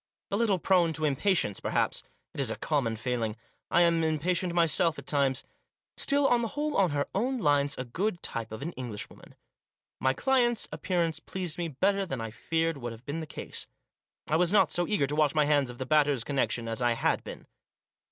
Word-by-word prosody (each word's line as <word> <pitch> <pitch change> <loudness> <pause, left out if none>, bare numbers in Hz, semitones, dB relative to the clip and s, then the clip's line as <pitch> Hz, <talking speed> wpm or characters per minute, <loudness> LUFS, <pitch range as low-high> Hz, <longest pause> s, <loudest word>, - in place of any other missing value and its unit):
A - - +1
little 210 -3 +2
prone 175 -2 +3
to 155 +1 -2
impatience, 150 - +1
perhaps; - - 0 0.3
it - - -8
is 135 -4 +2
a 110 - -2
common 135 -7 0
failing. 115 -2 -2 0.3
I 175 - +4
am 170 -1 +3
impatient 170 +3 0
myself 170 0 +2
at - - -9
times. 140 -3 +1 0.5
Still, 285 0 +3
on 245 -2 +3
the 230 - -1
whole, 295 +4 -2
on 190 -3 +4
her 145 -1 -1
own 255 +6 0
lines, 145 - +2
a 130 - -4
good 175 - -2
type 115 -2 -3
of 110 +4 -6
an 165 - -3
Englishwoman. 120 -8 -8 0.6
My 130 0 +2
client's 245 -3 +2
appearance 170 -4 -1
pleased 180 -3 -5
me 170 - -1
better 195 +7 +1
than 135 -9 -4
I 115 -1 -4
feared 165 +5 -1
would 120 -2 -5
have 115 +2 -14
been 150 +3 -3
the 160 - -6
case. - - -6 0.6
I 155 - +2
was 175 +1 +3
not 210 - +4
so 175 0 0
eager 205 -10 +2
to 145 +2 -3
wash 150 -1 +2
my 150 -1 +4
hands 145 -3 +2
of 120 - -9
the 130 - -4
Batters' 145 -3 +3
connection 125 -4 -1
as 115 +1 -2
I 120 -1 +3
had - - 0
been. - - -9
155 Hz, 205 wpm, -29 LUFS, 130-180 Hz, 0.6 s, I